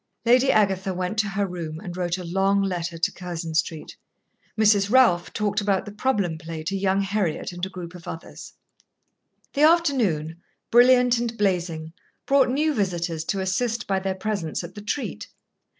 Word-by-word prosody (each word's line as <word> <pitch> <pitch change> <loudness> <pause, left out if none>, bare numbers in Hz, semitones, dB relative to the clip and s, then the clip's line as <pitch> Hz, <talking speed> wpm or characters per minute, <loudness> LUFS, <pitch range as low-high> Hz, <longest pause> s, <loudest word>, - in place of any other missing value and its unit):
Lady 250 +3 +5
Agatha 195 -3 +1
went 180 +3 -2
to 215 - +2
her 200 +1 -1
room 165 -4 -6
and 180 -2 -7
wrote 180 -1 -1
a 185 - -6
long 195 +3 +1
letter 175 -3 -3
to 165 - 0
Curzon 170 -2 -6
Street. 160 -1 -2 0.6
Mrs. 205 -2 +4
Ralph 230 -8 +4
talked 210 0 -1
about 200 -2 0
the 205 - -7
problem 205 -7 -1
play 165 -1 -7
to 190 +5 -2
young 195 0 +1
Heriot 195 -5 -1
and 175 0 -9
a - - -11
group 180 -2 -8
of 180 -2 -12
others. 165 - -8 1.0
The 285 - -1
afternoon, 240 - +2 0.3
brilliant 245 0 +5
and 235 -1 -3
blazing, 170 -5 -1 0.3
brought 275 -2 +4
new 300 +4 +1
visitors 175 - -1
to 195 +2 -1
assist 230 +5 -1
by 195 -1 0
their 190 0 -2
presence 190 -5 -3
at 170 +1 -9
the 205 - -9
treat. 235 +7 -4
195 Hz, 170 wpm, -24 LUFS, 175-215 Hz, 1.0 s, Lady